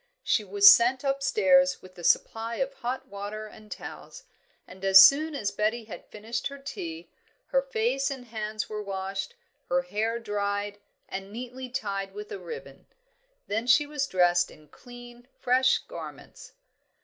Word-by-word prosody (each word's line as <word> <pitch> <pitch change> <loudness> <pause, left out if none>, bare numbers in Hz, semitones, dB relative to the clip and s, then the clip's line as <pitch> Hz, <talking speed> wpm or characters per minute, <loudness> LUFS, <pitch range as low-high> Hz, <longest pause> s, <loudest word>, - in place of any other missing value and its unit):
She 215 - +2
was 200 0 +5
sent 250 +3 +2
upstairs 275 0 +3
with 185 0 -14
a 175 - -11
supply 225 +6 +1
of 270 +3 -2
hot 260 +1 -4
water 205 0 -6
and 215 0 -14
towels, - - -9 0.4
and 185 +1 -14
as 195 0 +8
soon 300 +6 +5
as 210 -7 -2
Betty 220 +2 -1
had 215 - -10
finished 225 +3 -4
her 280 - -9
tea, 170 -11 -7 0.4
her - - +3
face 445 - -1
and 265 -3 -6
hands 215 -2 -4
were 215 0 -5
washed, 195 -1 -4 0.3
her 180 0 +2
hair 215 +5 -2
dried 205 -2 -3 0.3
and 195 +1 -7
neatly 250 +3 -7
tied 200 -5 -4
with 420 +1 -8
a 405 - -5
ribbon. 465 - -10 0.6
Then 220 +4 -2
she 290 +4 +5
was 290 -1 -2
dressed 175 -3 +3
in 150 -1 -17
clean, 245 0 -13
fresh 255 +1 +3
garments. - - -10
225 Hz, 155 wpm, -27 LUFS, 200-270 Hz, 0.6 s, as